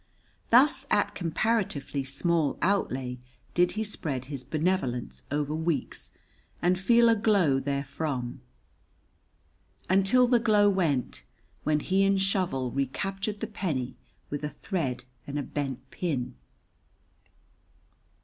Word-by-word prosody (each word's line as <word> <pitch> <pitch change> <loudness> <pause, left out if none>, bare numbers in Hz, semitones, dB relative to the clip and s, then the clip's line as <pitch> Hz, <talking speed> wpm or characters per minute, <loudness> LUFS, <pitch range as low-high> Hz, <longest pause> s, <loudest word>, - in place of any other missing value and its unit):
Thus 260 +6 +5
at - - +2
comparatively 170 -6 -1
small 150 +3 0
outlay 130 -10 0 0.3
did 175 0 +3
he 220 - -1
spread 145 - -3
his 135 -2 -5
benevolence 155 -7 -1
over 145 +1 -1
weeks 160 -3 -2 0.5
and 180 +1 +2
feel 235 +4 +5
a 230 - +5
glow 200 -11 +3
therefrom, 140 -2 -3 1.5
until 195 +7 +5
the 240 -1 +4
glow 210 -3 +4
went, 155 - 0 0.4
when 150 0 +1
he 190 +1 +2
and 195 0 +3
Shovel 185 -10 0
recaptured 195 - -2
the - - 0
penny 160 - -3 0.4
with 145 +1 -3
a 150 - -1
thread 150 -4 -3 0.2
and 145 +1 -3
a 145 - -1
bent 135 -2 -4
pin. 140 -9 -2
160 Hz, 115 wpm, -28 LUFS, 135-195 Hz, 1.5 s, Thus